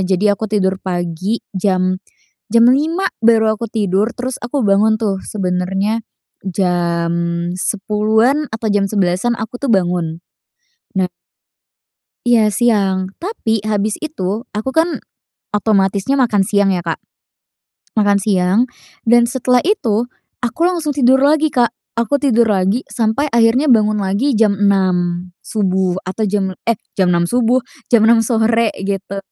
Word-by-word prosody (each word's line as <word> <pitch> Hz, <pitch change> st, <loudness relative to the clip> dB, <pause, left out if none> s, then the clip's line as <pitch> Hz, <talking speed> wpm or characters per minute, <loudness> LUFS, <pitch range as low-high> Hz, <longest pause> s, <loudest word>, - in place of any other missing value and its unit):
Jadi 195 Hz, +4 st, -1 dB
aku 215 Hz, +1 st, -3 dB
tidur 190 Hz, -2 st, 0 dB
pagi 180 Hz, +4 st, -2 dB, 0.2 s
jam 185 Hz, -1 st, 0 dB, 0.5 s
jam 230 Hz, 0 st, +5 dB
5.00 320 Hz, +9 st, +1 dB, 0.2 s
baru 220 Hz, -1 st, +4 dB
aku 230 Hz, -, -5 dB
tidur 210 Hz, +1 st, 0 dB
terus 255 Hz, 0 st, -4 dB
aku 245 Hz, +4 st, -2 dB
bangun 215 Hz, +3 st, +3 dB
tuh 205 Hz, -3 st, 0 dB
sebenernya 195 Hz, +3 st, -2 dB, 0.4 s
jam 175 Hz, -2 st, 0 dB, 0.5 s
10.00-an 220 Hz, +8 st, +1 dB
atau 220 Hz, 0 st, -3 dB
jam 205 Hz, -1 st, +2 dB
11.00-an 195 Hz, +3 st, +1 dB
aku 220 Hz, +3 st, -5 dB
itu 280 Hz, -, -1 dB
bangun. 175 Hz, -3 st, 0 dB, 0.8 s
Na 185 Hz, -1 st, +1 dB, 1.2 s
Iya 220 Hz, -3 st, +4 dB
siang. 195 Hz, -6 st, +1 dB
Tapi 265 Hz, -, -2 dB
habis 210 Hz, 0 st, -1 dB
itu 225 Hz, -, -4 dB
aku 215 Hz, +5 st, -3 dB
kan 325 Hz, +4 st, 0 dB, 0.5 s
otomatisnya 205 Hz, +3 st, +1 dB
makan 230 Hz, -7 st, +2 dB
siang 200 Hz, -2 st, +2 dB
ya, 180 Hz, -, -1 dB
Kak. 165 Hz, -1 st, -3 dB, 1.0 s
Makan 205 Hz, -1 st, +3 dB
siang 195 Hz, +2 st, +2 dB, 0.4 s
dan 235 Hz, +1 st, +4 dB
setelah 250 Hz, 0 st, +1 dB
itu 245 Hz, -, 0 dB, 0.3 s
aku 245 Hz, +5 st, -4 dB
langsung 335 Hz, -5 st, 0 dB
tidur 265 Hz, -1 st, +4 dB
lagi, 300 Hz, +2 st, +3 dB
Kak. 240 Hz, -2 st, +3 dB, 0.3 s
Aku 235 Hz, +3 st, 0 dB
tidur 240 Hz, -5 st, +2 dB
lagi 200 Hz, +2 st, +1 dB
sampai 230 Hz, +4 st, 0 dB
akhirnya 235 Hz, +3 st, +3 dB
bangun 215 Hz, -3 st, +3 dB
lagi 200 Hz, +8 st, 0 dB
jam 215 Hz, -3 st, +3 dB
6.00 185 Hz, -3 st, +1 dB
subuh 190 Hz, -3 st, -1 dB
atau 190 Hz, +4 st, -3 dB
jam 195 Hz, -2 st, -1 dB
eh, 230 Hz, -3 st, 0 dB, 0.2 s
jam 185 Hz, -2 st, +2 dB
6.00 170 Hz, -1 st, +2 dB
subuh? 245 Hz, +4 st, +2 dB, 0.3 s
Jam 220 Hz, -2 st, +5 dB
6.00 230 Hz, 0 st, +5 dB
sore, 225 Hz, 0 st, +2 dB, 0.2 s
gitu, 195 Hz, 0 st, -3 dB
215 Hz, 135 wpm, -17 LUFS, 190-235 Hz, 1.2 s, jam